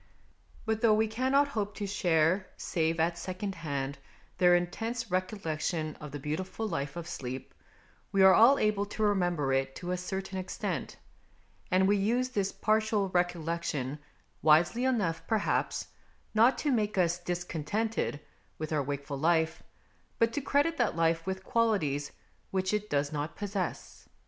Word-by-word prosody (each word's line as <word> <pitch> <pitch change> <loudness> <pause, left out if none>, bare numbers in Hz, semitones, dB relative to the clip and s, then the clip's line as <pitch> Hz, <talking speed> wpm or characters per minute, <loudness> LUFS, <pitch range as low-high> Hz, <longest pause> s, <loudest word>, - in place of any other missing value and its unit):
But, 220 -1 -1
though 220 -2 +5
we 220 +1 +2
cannot 260 +6 +2
hope 210 -5 -3
to 205 - -3
share, 180 -1 +2
save 165 0 -1
at 170 +1 +1
secondhand, 165 -8 -4 0.4
their 180 -1 +6
intense 225 +6 -2
recollection 165 -4 -2
of 150 - -6
the 145 - -5
beautiful 175 +10 -3
life 140 -6 -3
of 170 -1 -6
sleep, 130 -5 -6 0.6
we 195 -1 +4
are 190 0 +9
all 245 +7 +7
able 210 -1 +1
to 215 +1 -3
remember 175 -9 +1
it 135 0 0
to 180 0 -5
a 180 - 0
certain 190 +1 -4
extent; 185 - -4 0.7
and 190 +1 +4
we 205 +1 +4
use 240 +6 +1
this 200 -5 -1
partial 215 -2 +1
recollection, 170 -6 -1 0.4
wisely 170 - +4
enough 205 -11 +1
perhaps, 220 -2 0 0.4
not 230 +4 +5
to 295 - 0
make 210 -4 0
us 175 -1 +2
discontented 175 +1 -2 0.4
with 155 0 -4
our 150 - +2
wakeful 140 0 -4
life, 160 +1 +2 0.6
but 230 0 +2
to 290 - -1
credit 285 +4 +1
that - - +1
life 165 +1 +1
with 190 0 -3
qualities 195 - +1 0.4
which 190 +1 -1
it 210 0 -1
does 145 0 0
not 150 +1 -3
possess. 200 -3 -4
185 Hz, 150 wpm, -30 LUFS, 160-215 Hz, 0.7 s, are